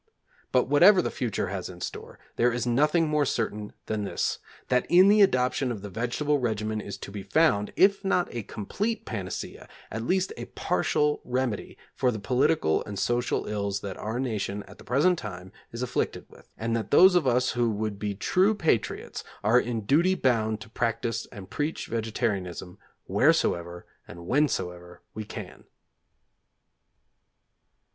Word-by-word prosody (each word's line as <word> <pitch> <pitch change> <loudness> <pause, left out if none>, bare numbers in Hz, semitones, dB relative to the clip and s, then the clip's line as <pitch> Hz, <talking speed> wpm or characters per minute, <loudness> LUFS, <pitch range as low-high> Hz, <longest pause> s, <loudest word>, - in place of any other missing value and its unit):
But 125 - +4
whatever 175 +8 +7
the - - 0
future 115 -7 -2
has 95 -2 -4
in 90 -1 -10
store, - - -7 0.2
there 120 +1 +3
is 125 +1 -2
nothing 150 +7 +3
more 150 -1 +2
certain 105 -5 -2
than 110 -1 -2
this 100 - -1 0.3
that 125 0 +2
in 185 +3 +7
the 210 +1 +6
adoption 130 -6 +2
of 105 -4 -6
the 100 - -7
vegetable 125 +7 0
regimen 110 -3 -1
is 100 - -7
to - - -9
be 100 0 -6
found, 105 -1 +2
if 200 +1 +4
not 180 -2 +1
a 120 - -3
complete 205 - -3
panacea, 95 -6 -6 0.2
at 115 - -3
least 185 +9 0
a - - -5
partial 150 0 0
remedy, 125 -3 -2 0.2
for 125 - +1
the 115 - -2
political 125 - +1
and 100 -1 -6
social 120 +3 0
ills 100 -1 -2
that 100 -1 -5
our 110 +3 -3
nation 105 -5 -2
at - - -15
the - - -12
present 150 - +2
time 90 -4 -8 0.2
is 115 +2 -4
afflicted 125 - -2
with, - - -18
and 115 +1 -1
that 115 - -3
those 185 +5 +7
of 175 -6 +3
us 125 +1 +2
who 120 -1 +1
would 105 -1 -3
be 105 -1 -2
true 190 - +2
patriots 160 - -1 0.2
are 110 +4 +5
in 120 -2 -2
duty 170 - +3
bound 110 - +1
to 105 - -10
practise 115 -1 -2
and 100 -4 -11
preach 150 +2 -2
vegetarianism 105 -6 -3 0.3
wheresoever 85 0 +1 0.2
and 85 - -10
whensoever 90 - -1
we 110 - -5
can. - - -9
115 Hz, 165 wpm, -27 LUFS, 105-145 Hz, 0.3 s, whatever